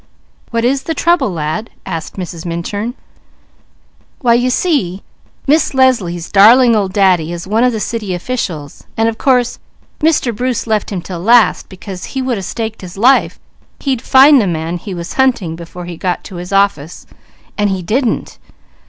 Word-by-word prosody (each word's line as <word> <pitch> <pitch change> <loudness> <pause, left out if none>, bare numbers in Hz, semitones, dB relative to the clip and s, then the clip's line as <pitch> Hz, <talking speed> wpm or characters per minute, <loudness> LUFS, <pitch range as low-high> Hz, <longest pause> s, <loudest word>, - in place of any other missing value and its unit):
"What 230 0 -1
is 265 +2 +1
the 325 +4 -4
trouble, 340 -4 +2
lad?" 165 +6 -3 0.2
asked 160 -1 -5
Mrs. 175 -3 -6
Minturn. 200 +8 -4 1.3
"Why 235 -2 +4
you 245 +2 +2
see 250 - 0 0.4
Miss 295 0 +2
Leslie's 200 -11 +1
'darling 230 +4 +6
old 200 -3 0
Daddy' 185 -5 +2
is 170 -1 -6
one 215 +5 +1
of 250 - +3
the 220 - -3
city 210 -3 -3
officials, 175 - -5
and 225 0 +2
of 225 -1 -3
course 250 -2 +1 0.4
Mr. 300 -7 +1
Bruce 250 +1 -2
left 215 -2 -1
him 185 -4 -4
'til 180 -3 -6
last, 230 +5 +3
because 190 -1 -9
he - - +1
would 250 -5 -1
a - - -5
staked 220 +3 -5
his 185 0 -10
life 255 +6 +3 0.4
he'd 265 -4 -1
find 270 +1 +6
the 205 - 0
man 165 0 -2
he 190 +2 -7
was 170 -1 -6
hunting 215 -11 +1
before 170 +1 -9
he 175 -1 -7
got 180 0 -2
to 190 - -9
his 180 +2 -7
office, 195 -6 0 0.5
and 205 0 +1
he 190 -2 -2
_didn't! 230 +6 -1
210 Hz, 170 wpm, -15 LUFS, 175-245 Hz, 1.3 s, darling